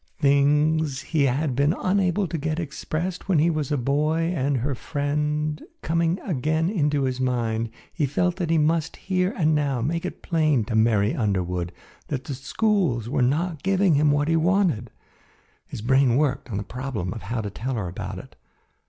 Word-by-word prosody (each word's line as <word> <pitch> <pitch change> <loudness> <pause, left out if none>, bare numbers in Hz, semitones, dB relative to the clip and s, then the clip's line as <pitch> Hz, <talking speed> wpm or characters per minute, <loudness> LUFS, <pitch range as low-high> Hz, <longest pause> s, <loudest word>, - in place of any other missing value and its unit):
Things 145 +1 +2
he 145 +1 +1
had 135 +1 0
been 145 +5 +2
unable 185 0 +1
to 165 - -3
get 155 +2 -2
expressed 165 +4 -4
when 185 - +4
he 165 +3 +4
was 155 -3 -2
a 145 - +2
boy 155 +6 +1
and 140 -2 +1
her 135 +4 -1
friend, 150 +2 -2 0.2
coming 165 +2 +1
again 160 +1 0
into 150 -7 +1
his 130 -1 -1
mind, 115 -3 0 0.2
he 150 -4 0
felt 180 +6 0
that 175 -4 -2
he 165 - +3
must 160 +1 +1
here 185 0 0
and 155 -4 +3
now 145 -4 +1
make 165 +8 -1
it 180 - -6
plain 155 -8 +2
to 110 - -3
Mary 110 -1 +3
Underwood 90 -5 -1 0.4
that 135 -3 -3
the 140 - -5
schools 140 - 0
were 130 - 0
not 155 +5 0
giving 195 -2 +3
him 150 +1 +4
what 145 0 +2
he 165 - +2
wanted. 165 - +2 0.8
His 105 - -7
brain 130 0 +4
worked 140 -2 0
on 100 - -3
the 100 - -2
problem 120 -6 -4
of 115 - -7
how 110 +5 -3
to 105 -2 -5
tell 130 +6 -3
her 105 -5 -2
about 85 - -6
it. - - -11
145 Hz, 185 wpm, -24 LUFS, 125-165 Hz, 0.8 s, when